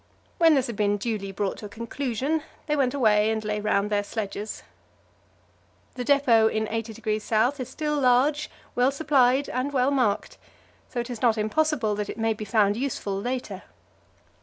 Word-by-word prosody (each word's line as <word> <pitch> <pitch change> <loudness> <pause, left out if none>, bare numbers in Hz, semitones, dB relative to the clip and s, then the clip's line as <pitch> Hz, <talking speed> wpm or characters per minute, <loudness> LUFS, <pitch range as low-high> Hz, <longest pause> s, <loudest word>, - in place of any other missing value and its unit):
When 325 -2 +6
this 265 -2 +2
had 235 - -5
been 205 0 +1
duly 205 -2 -3
brought 195 0 -2
to 210 - -7
a - - -16
conclusion, 260 +6 -2 0.2
they 300 - 0
went 270 -2 +1
away 215 -5 +3
and 220 -1 -2
lay 210 0 -1
round 205 0 0
their 205 -1 +1
sledges. 205 0 -5 1.3
The 250 - -4
depot 245 -5 +4
in 220 0 0
80° 220 -1 -3
S. 245 +6 +2
is 255 -1 -4
still 300 +2 -2
large, 280 +4 +3 0.2
well 250 +2 +3
supplied 275 -2 +2
and 255 +3 -2
well 265 0 +2
marked, 230 -7 0 0.5
so 245 - -2
it 240 +1 -7
is 235 - -6
not 235 -3 +3
impossible 230 +1 +1
that 205 0 -3
it - - -6
may 225 0 +1
be 215 0 -7
found 205 -1 +2
useful 240 -6 -2
later. 245 -5 -4
230 Hz, 175 wpm, -25 LUFS, 215-270 Hz, 1.3 s, When